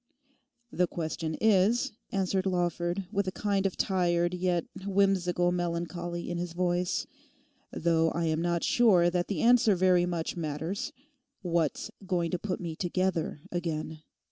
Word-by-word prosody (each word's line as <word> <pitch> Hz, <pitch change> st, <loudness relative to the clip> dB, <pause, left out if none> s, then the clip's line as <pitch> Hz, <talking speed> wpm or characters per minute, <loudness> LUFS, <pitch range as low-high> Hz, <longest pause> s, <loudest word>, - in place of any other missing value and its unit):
'The 180 Hz, 0 st, +1 dB
question 160 Hz, -1 st, -3 dB
is,' 220 Hz, -, +3 dB, 0.2 s
answered 190 Hz, 0 st, 0 dB
Lawford, 175 Hz, +1 st, -1 dB
with 200 Hz, -1 st, 0 dB
a -, -, 0 dB
kind 200 Hz, -1 st, 0 dB
of 190 Hz, -, -6 dB
tired 175 Hz, -2 st, +1 dB
yet 180 Hz, -2 st, 0 dB, 0.2 s
whimsical 190 Hz, -3 st, +2 dB
melancholy 175 Hz, 0 st, -3 dB
in 175 Hz, 0 st, -3 dB
his 175 Hz, -1 st, -4 dB
voice, 180 Hz, 0 st, 0 dB, 0.7 s
'though 165 Hz, -1 st, +2 dB
I 170 Hz, +1 st, -1 dB
am 160 Hz, 0 st, 0 dB
not 170 Hz, 0 st, 0 dB
sure 185 Hz, -8 st, +4 dB
that 175 Hz, 0 st, 0 dB
the 205 Hz, -, -2 dB
answer 230 Hz, -3 st, +5 dB
very 180 Hz, -1 st, +3 dB
much 170 Hz, -2 st, -2 dB
matters—what's 170 Hz, -, -4 dB, 0.2 s
going 175 Hz, -3 st, 0 dB
to 180 Hz, -, -1 dB
put 190 Hz, -1 st, -3 dB
me 170 Hz, -3 st, -5 dB
together 175 Hz, -3 st, -1 dB
again? 160 Hz, -3 st, -3 dB
175 Hz, 140 wpm, -29 LUFS, 170-190 Hz, 0.7 s, answer